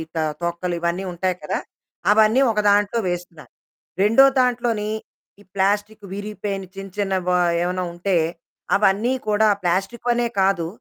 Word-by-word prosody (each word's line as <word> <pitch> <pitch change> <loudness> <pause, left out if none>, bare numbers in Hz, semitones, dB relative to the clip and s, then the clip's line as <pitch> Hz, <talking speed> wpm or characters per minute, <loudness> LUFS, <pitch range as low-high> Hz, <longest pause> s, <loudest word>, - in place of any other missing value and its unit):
త - - 0 0.2
తొక్కలు 170 +1 -2
ఇవన్నీ 170 +2 -1
ఉంటాయి 185 +1 -1
కదా! 150 - -2 0.5
అవన్నీ 220 +4 +5
ఒక 210 - -1
దాంట్లో 205 +3 +2
వేస్తున్నాను. 175 -3 -6 0.5
రెండో 225 +7 +6 0.2
దాంట్లోని, 235 -4 0 0.5
ఈ - - -17
ప్లాస్టిక్ 205 +2 0
విరిగిపోయిన 205 -1 -4
చిన్న 195 0 -7
చిన్న 200 -2 -1
వ - - +2 0.3
ఏమైనా 180 +1 -1
ఉంటే. 180 +2 -1 0.6
అవన్నీ 210 +5 +2
కూడా 215 +1 +3 0.2
ప్లాస్టిక్ 195 +7 -1
వనే 240 0 +2
కాదు. 190 -4 +2
200 Hz, 135 wpm, -22 LUFS, 180-215 Hz, 0.6 s, రెండో